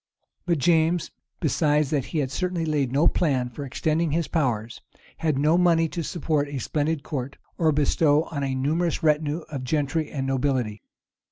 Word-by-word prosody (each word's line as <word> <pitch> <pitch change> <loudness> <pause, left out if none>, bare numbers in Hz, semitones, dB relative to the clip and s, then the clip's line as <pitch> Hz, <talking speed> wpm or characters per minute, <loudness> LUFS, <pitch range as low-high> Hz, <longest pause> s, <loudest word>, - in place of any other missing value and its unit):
But 170 -2 +2
James, 165 +3 +2 0.3
besides 150 -1 +1
that 145 -4 0
he 165 - -4
had 135 -3 0
certainly 180 +1 -1
laid 145 -5 0
no 140 +4 +3
plan 130 -8 +1
for 140 - -7
extending 155 +4 0
his 165 +2 0
power, 120 -9 0 0.5
had 155 -4 0
no 155 +5 +3
money 165 -2 +4
to 170 - -4
support 155 -2 -1
a 140 -1 -5
splendid 150 +4 -1
court, 140 -2 -5 0.2
or 160 -2 +4
bestow 150 +1 +3
on 140 -3 -3
a 135 -1 -1
numerous 160 +6 0
retinue 155 +1 +1
of 135 -4 -4
gentry 150 +3 -1
and 135 -2 -3
nobility. 130 -6 -1
150 Hz, 170 wpm, -25 LUFS, 135-160 Hz, 0.5 s, money